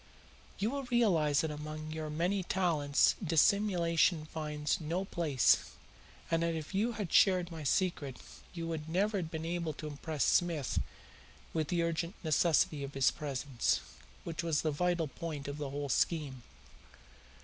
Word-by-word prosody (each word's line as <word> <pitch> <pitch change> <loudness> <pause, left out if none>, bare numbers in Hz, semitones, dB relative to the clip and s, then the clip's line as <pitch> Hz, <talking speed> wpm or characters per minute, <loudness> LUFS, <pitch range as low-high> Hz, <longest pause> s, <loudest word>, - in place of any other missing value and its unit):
You 210 +4 0
will 280 -1 -3
realize 180 - +3
that 160 - -2
among 155 +1 -6
your 155 -1 -4
many 175 +6 0
talents 165 -6 +2
dissimulation 170 -1 +3
finds 150 0 -2
no 170 +5 -2
place, 155 - +2 0.6
and 165 0 +2
that 170 0 0
if 160 +3 -6
you 220 +5 +1
had 205 -6 -4
shared 185 -3 +4
my 160 -2 -6
secret 145 -3 0 0.3
you 165 -2 -5
would 160 -1 -4
never 200 +5 +1
have 170 -4 -3
been 160 0 -5
able 170 -2 -2
to 150 - -8
impress 150 0 -3
Smith 170 -6 +2 0.7
with 155 -2 0
the 170 +1 +1
urgent 170 +2 -2
necessity 155 -2 +2
of 140 0 -7
his 135 -1 +4
presence, 135 - -1 0.4
which 165 -2 -4
was 160 -3 0
the 155 - +1
vital 175 +1 0
point 150 -2 -6
of 140 +1 -5
the 145 -2 -3
whole 145 +1 -3
scheme. 140 -1 0
160 Hz, 155 wpm, -32 LUFS, 150-175 Hz, 0.7 s, shared